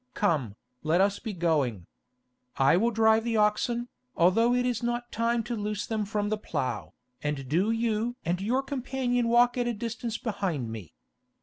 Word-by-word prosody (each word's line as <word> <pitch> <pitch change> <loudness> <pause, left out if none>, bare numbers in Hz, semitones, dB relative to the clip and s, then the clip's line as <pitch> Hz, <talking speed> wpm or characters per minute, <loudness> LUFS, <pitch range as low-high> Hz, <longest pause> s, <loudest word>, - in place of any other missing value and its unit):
Come, 150 - 0 0.3
let 160 +3 +2
us 200 +1 +2
be 225 - -5
going. 150 - 0 0.7
I 135 +3 +5
will 225 +6 +3
drive 220 -1 +3
the 230 -1 0
oxen, 225 +3 +1 0.3
although 225 +8 +4
it 250 0 +1
is 245 -3 -1
not 240 0 -2
time 230 +1 0
to 240 +1 -3
loose 210 -1 -3
them 220 -2 -2
from 205 0 -1
the 215 0 -1
plough, 135 - -3 0.3
and 145 -3 -3
do 175 - +1
you 230 +1 0
and 175 +2 0
your 250 +7 +1
companion 255 -3 -1
walk 245 +1 +4
at 240 - 0
a 240 - -1
distance 230 +1 -4
behind 185 - -2
me. 105 -8 -9
215 Hz, 175 wpm, -28 LUFS, 170-235 Hz, 0.7 s, I